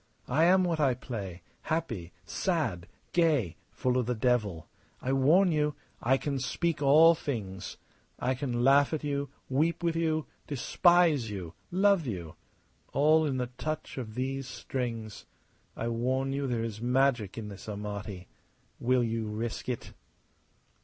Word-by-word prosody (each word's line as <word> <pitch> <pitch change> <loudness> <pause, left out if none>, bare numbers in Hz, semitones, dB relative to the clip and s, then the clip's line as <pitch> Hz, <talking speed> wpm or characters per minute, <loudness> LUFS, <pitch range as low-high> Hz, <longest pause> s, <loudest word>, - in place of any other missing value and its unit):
I 155 +6 +3
am 185 +1 +5
what 170 -3 0
I 135 -4 +3
play 100 -8 -6 0.2
happy, 120 - -3
sad, 115 - -1 0.3
gay, 150 - +2
full 130 0 0
of 120 - -1
the 125 - 0
devil. 110 -8 0 0.3
I 130 - -1
warn 165 +8 +5
you. 150 -1 +1 0.3
I 130 +3 +3
can 140 -1 -2
speak 165 +4 -1
all 155 +4 +7
things. 105 - -5 0.4
I 130 - 0
can 125 -2 -2
laugh 140 +3 +5
at 155 - -5
you, 140 -1 -2 0.2
weep 160 +6 +1
with 170 -1 +1
you, 160 -2 0 0.2
despise 155 -2 +3
you, 90 -5 -6 0.2
love 190 -3 +3
you! 85 -8 -5 0.6
All 155 +3 +4
in 135 -3 -1
the 125 -1 -2
touch 155 -3 -4
of 110 -4 -6
these 135 +1 -2
strings. 115 -6 -5 0.5
I 115 - -2
warn 130 +3 0
you 140 0 -1
there 120 -3 -1
is 110 -1 -5
magic 125 -4 +1
in 110 -2 -5
this 100 +1 -10
Amati. 100 -2 -5 0.5
Will 125 0 +2
you 115 -1 -1
risk 110 +3 -4
it?" 125 - -4
130 Hz, 150 wpm, -29 LUFS, 110-150 Hz, 0.6 s, all